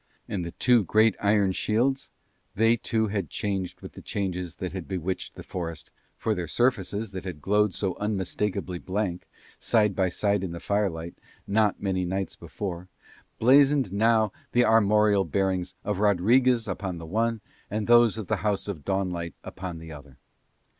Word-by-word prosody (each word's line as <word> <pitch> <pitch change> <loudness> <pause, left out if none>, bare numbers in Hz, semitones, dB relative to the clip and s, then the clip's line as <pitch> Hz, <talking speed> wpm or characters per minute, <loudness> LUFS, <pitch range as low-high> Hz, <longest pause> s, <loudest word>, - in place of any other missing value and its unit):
And 95 -4 -3
the 85 - -4
two 120 -3 +3
great 110 +3 +3
iron 100 -2 +3
shields, 125 +8 0 0.5
they 115 +3 +4
too 110 -1 -1
had 100 -6 -2
changed 100 -4 -3
with - - -9
the - - -11
changes 90 -4 -3
that 90 -2 -5
had 95 -3 -6
bewitched 95 0 -4
the - - -9
forest, 85 -5 -6 0.3
for - - 0
their 90 -2 -3
surfaces 110 0 0
that 95 -2 -6
had 90 -5 -6
glowed 105 +3 +2
so 95 -3 -1
unmistakably 100 -2 -2
blank, 95 -2 -3 0.3
side 105 -4 +2
by 95 -1 +2
side 100 +2 0
in 90 -3 -4
the 85 - -6
firelight, 85 -5 -1 0.3
not 105 0 +1
many 95 -2 0
nights 95 +2 -3
before, 90 +1 -6 0.5
blazoned 135 -2 +4
now 110 0 +3 0.2
the 120 0 +4
armorial 105 -2 +4
bearings 95 -2 -1
of 105 -2 -2
Rodriguez 115 +4 +3
upon 95 -2 -3
the 85 - -8
one 115 +6 0 0.3
and 105 0 -2
those 120 -1 +5
of 110 - -4
the - - 0
house 105 -2 -1
of 90 -8 -5
Dawnlight 90 -4 -2
upon 90 -2 -6
the 80 0 -10
other. 70 -3 -12
100 Hz, 165 wpm, -26 LUFS, 90-110 Hz, 0.5 s, those